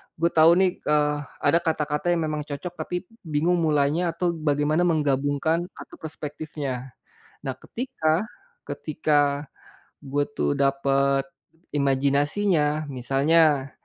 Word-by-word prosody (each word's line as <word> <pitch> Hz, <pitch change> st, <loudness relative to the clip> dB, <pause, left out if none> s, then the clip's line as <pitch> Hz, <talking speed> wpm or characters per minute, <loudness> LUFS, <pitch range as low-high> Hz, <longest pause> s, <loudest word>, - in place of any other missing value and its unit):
gue 170 Hz, +1 st, +1 dB
tahu 160 Hz, +1 st, +6 dB
nih, 185 Hz, 0 st, +2 dB
eee, 150 Hz, 0 st, +1 dB, 0.3 s
ada 160 Hz, +4 st, +4 dB
kata-kata 155 Hz, -2 st, -1 dB
yang 165 Hz, -, 0 dB
memang 150 Hz, -1 st, -4 dB
cocok 145 Hz, +5 st, -5 dB
tapi 180 Hz, 0 st, -3 dB, 0.2 s
bingung 160 Hz, +4 st, +1 dB
mulainya 160 Hz, +2 st, +1 dB
atau 175 Hz, 0 st, +1 dB
bagaimana 155 Hz, +1 st, +1 dB
menggabungkan 150 Hz, +2 st, +1 dB
atau -, -, -12 dB
perspektifnya. 145 Hz, -4 st, -6 dB, 0.5 s
Nah, -, -, -1 dB
ketika 215 Hz, -8 st, -1 dB, 0.4 s
ketika 150 Hz, -1 st, 0 dB, 0.8 s
gue 145 Hz, +1 st, 0 dB
tuh 145 Hz, -, 0 dB
dapet 140 Hz, 0 st, +1 dB, 0.4 s
imajinasinya 145 Hz, +3 st, +1 dB
misalnya, 140 Hz, +2 st, +2 dB
150 Hz, 110 wpm, -25 LUFS, 140-165 Hz, 0.8 s, tahu